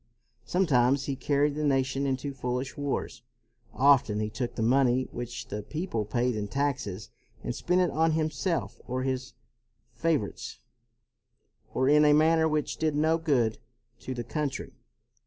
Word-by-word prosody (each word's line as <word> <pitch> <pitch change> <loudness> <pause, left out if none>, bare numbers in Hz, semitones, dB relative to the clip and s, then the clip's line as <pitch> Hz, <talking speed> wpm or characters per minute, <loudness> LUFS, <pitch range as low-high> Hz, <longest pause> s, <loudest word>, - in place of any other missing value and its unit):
Sometimes 135 -4 +2
he 140 - -2
carried 145 +2 +1
the 150 +1 -3
nation 135 -1 +1
into 135 +1 -2
foolish 125 0 -3
wars. 145 -4 -3 0.5
Often 130 -6 +4
he 105 0 -2
took 120 0 -4
the 115 - -1
money 130 +1 +3
which 120 0 -6
the 105 +1 -4
people 150 - -3
paid 120 +2 0
in 105 -1 -3
taxes 125 -6 -2 0.3
and - - -2
spent 180 +1 +1
it 175 -4 +2
on 160 +2 +2
himself 155 +2 -1
or 130 +1 -2
his 130 -1 -3 0.6
favorites, 155 -11 -2 1.1
or 130 - +1
in 150 +1 +6
a 150 0 +6
manner 160 +1 +4
which 150 -1 -1
did 155 -2 0
no 160 +2 +2
good 130 -9 +1 0.4
to 130 - -5
the 120 - -3
country. 145 +3 -3
135 Hz, 150 wpm, -28 LUFS, 125-150 Hz, 1.1 s, in